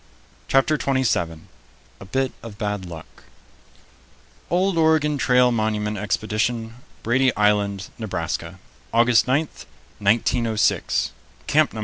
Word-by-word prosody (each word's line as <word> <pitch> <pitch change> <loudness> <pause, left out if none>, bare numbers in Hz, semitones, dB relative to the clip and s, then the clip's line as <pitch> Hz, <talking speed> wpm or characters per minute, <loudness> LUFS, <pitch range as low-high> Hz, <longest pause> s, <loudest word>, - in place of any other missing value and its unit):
] - - -31
CHAPTER 135 +3 +2
TWENTY 130 -1 +1
SEVEN 80 -9 -1 0.5
A - - -10
BIT 130 +6 -1
OF 110 -3 -10
BAD 105 -3 -3
LUCK 85 -3 -8 1.4
"OLD 185 +1 +1
Oregon 160 -3 +2
Trail 125 -1 +4
Monument 110 -2 -1
Expedition, 110 +3 -1 0.3
Brady 130 +3 +3
Island, 100 -2 +1
Nebraska, 85 -4 -4 0.3
August 115 +1 +4
9, 145 +5 +2 0.5
1906, 110 +1 +1 0.3
Camp 155 0 +2
No. 110 - -6
115 Hz, 110 wpm, -22 LUFS, 105-130 Hz, 1.4 s, Trail